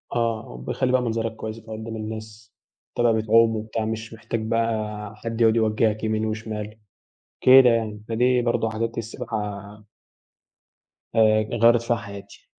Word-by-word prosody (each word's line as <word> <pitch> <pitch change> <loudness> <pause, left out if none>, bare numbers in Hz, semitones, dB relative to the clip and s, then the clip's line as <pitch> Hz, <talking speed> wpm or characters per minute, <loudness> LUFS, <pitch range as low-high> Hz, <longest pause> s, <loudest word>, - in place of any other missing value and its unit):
آه، 115 - -2
بيخلّي 125 - 0
بقى 130 0 +3
منظرك 115 -1 -2
كويّسة 110 +1 -7
بقى - - -9
قدّام 110 +1 -6
الناس، 110 -1 -8 0.4
تبقى 120 -1 +3
بتعوم 115 +1 +4
وبتاع 110 0 -3
مش 110 +1 -5
محتاج 115 +1 -4
بقى 110 -2 -2
حد 115 +2 -5
يقعد 115 -1 +5
يوجهك 110 -1 +1
يمين 110 0 0
وشمال، 110 -1 -5 0.6
كده 130 -1 +8
يعني، 110 -3 -1
فدي 125 +2 +2
برضه 120 -1 0
حاجات 115 +1 -3
السباحة 105 -2 -5 1.3
آآ، 110 -1 +5 0.2
غيرّت 120 0 +6
فيها 120 0 0
حياتي. 100 -2 -11
110 Hz, 140 wpm, -24 LUFS, 110-115 Hz, 1.3 s, كده